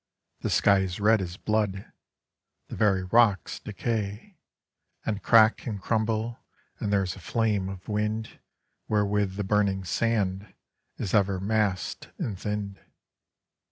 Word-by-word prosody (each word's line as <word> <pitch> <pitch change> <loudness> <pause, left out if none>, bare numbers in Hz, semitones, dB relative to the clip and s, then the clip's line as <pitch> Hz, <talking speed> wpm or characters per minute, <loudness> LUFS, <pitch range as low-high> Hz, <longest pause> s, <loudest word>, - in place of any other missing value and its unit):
The - - -2
sky 100 -1 +4
is 95 -1 -2
red 105 0 +4
as 90 0 -5
blood; 105 -3 -1 0.8
The - - -6
very 95 -3 +2
rocks 100 -3 +3
decay 110 - -4 0.7
And 105 -2 -2
crack 110 +2 +5
and 105 -4 -3
crumble, 110 +2 -1 0.4
and 105 - -2
There 100 -1 +3
is 90 - -3
a - - -11
flame 105 -1 0
of 95 -1 -9
wind 105 +1 -2 0.5
Wherewith 105 -2 +1
the 105 - -2
burning 100 -1 +1
sand 100 -1 -1 0.4
Is 95 - -4
ever 100 -2 +3
mass'd 100 -1 -1
and 105 - -3
thin'd. 105 -2 -4
105 Hz, 130 wpm, -27 LUFS, 95-110 Hz, 0.8 s, crack